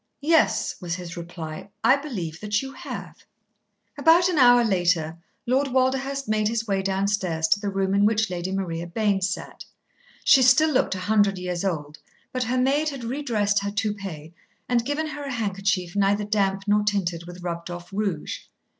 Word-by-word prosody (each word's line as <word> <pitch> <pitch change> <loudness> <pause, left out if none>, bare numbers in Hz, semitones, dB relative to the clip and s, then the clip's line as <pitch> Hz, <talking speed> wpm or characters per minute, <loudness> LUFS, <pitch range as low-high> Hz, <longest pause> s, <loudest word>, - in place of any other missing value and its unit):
"Yes," 320 +2 +3
was 170 -2 -3
his 175 -2 -7
reply. 170 0 -7
"I 235 +4 +6
believe 195 - -5
that 210 +2 -1
you 270 0 -7
have." - - -8 0.8
About 335 +4 +5
an 340 -5 +1
hour 245 -1 +7
later 175 -6 +1 0.3
Lord 265 +3 +2
Walderhurst 265 +1 0
made 215 0 +1
his 225 0 -1
way 195 -3 0
downstairs 190 -4 0
to 205 - +4
the 205 -1 -2
room 195 0 -1
in 200 +1 +3
which 220 0 +1
Lady 180 0 -4
Maria 170 -3 -3
Bayne 200 +1 0
sat. 190 +1 -4 0.6
She 270 - +6
still 265 +5 +5
looked 255 -8 +1
a - - -5
hundred 205 -2 +3
years 180 -1 -3
old, 150 -6 -3 0.3
but 255 -1 -1
her 250 +3 -1
maid 280 +4 +2
had 275 -4 -7
redressed 230 -6 0
her 200 0 -3
toupee, 200 -7 -4 0.3
and 240 -2 +2
given 290 +5 -2
her 295 -2 -6
a 280 - -4
handkerchief 195 -5 -1
neither 200 +1 +2
damp 195 -2 0
nor 210 0 +3
tinted 180 -5 -1
with 175 0 -10
rubbed 170 -1 -4
off 175 +2 -8
rouge. 195 -6 -2
205 Hz, 175 wpm, -24 LUFS, 180-245 Hz, 0.8 s, hour